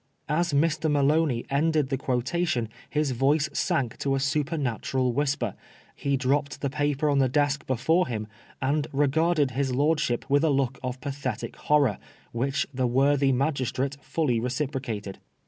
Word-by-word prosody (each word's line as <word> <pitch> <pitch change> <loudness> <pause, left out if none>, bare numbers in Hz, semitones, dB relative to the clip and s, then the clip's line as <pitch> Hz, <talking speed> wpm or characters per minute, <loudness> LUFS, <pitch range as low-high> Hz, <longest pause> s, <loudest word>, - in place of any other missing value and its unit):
As 170 +3 +1
Mr. 155 +2 +1
Maloney 145 -3 +2
ended 150 -1 +2
the 135 - 0
quotation 130 -1 -1 0.2
his 150 -2 0
voice 140 +5 +2
sank 140 - -1
to 135 -1 0
a - - 0
supernatural 135 -4 -1
whisper, 135 -6 0 0.4
he 140 -1 0
dropped 140 +2 0
the 140 - -1
paper 145 0 0
on 140 -1 +3
the 130 -1 +3
desk 145 +1 0
before 160 +8 +2
him, 110 -3 -3 0.4
and 145 +2 +1
regarded 145 +1 +2
his 130 0 -1
lordship 145 -4 +1
with 145 +2 +3
a 160 - +3
look 135 -2 0
of 130 0 -4
pathetic 140 -5 -4
horror, 145 -8 +2 0.3
which 135 +4 0
the 130 -1 0
worthy 135 +2 +3
magistrate 135 0 0
fully 135 -5 0
reciprocated. 125 -5 -3
140 Hz, 145 wpm, -26 LUFS, 130-150 Hz, 0.4 s, on